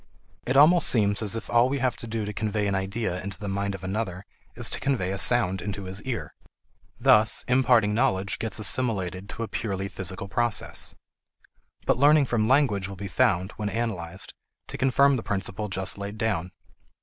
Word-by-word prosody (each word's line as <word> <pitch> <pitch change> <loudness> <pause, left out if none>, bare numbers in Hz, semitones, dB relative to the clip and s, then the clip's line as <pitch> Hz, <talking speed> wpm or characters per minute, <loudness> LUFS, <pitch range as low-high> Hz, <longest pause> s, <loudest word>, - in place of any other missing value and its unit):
It 130 +2 +1
almost 165 +5 +6
seems 100 -3 +2
as 110 -1 +1
if 115 - -5
all 120 +2 +3
we 140 - -1
have 130 -3 0
to 115 - -7
do 110 -1 -3
to 105 - -5
convey 105 0 -2
an 100 - 0
idea 95 -1 -2
into 100 0 -6
the 105 - -7
mind 100 0 -2
of 95 - -11
another 95 -1 -4 0.3
is - - 0
to - - -1
convey 120 -10 -1
a 95 - -3
sound 95 -6 +2
into 100 -1 -5
his 95 +2 -6
ear. 125 -1 -5 0.6
Thus 110 +1 +4
imparting 125 -5 +3
knowledge 105 -5 0
gets 110 -3 -3
assimilated 100 -4 +2
to 115 - -5
a - - -4
purely 100 -4 -3
physical 95 +1 -5
process. 120 +2 +1 0.9
But - - +2
learning 145 +1 +5
from 115 -4 0
language 125 -8 +2
will 100 - -8
be 100 +1 -6
found, 90 +1 +1
when 105 -1 -2
analyzed, 100 -6 -4 0.4
to - - -5
confirm 135 +2 +3
the - - -4
principle 105 0 -3
just 95 0 -1
laid 100 +1 -6
down. 100 -6 -1
105 Hz, 185 wpm, -25 LUFS, 95-120 Hz, 0.9 s, almost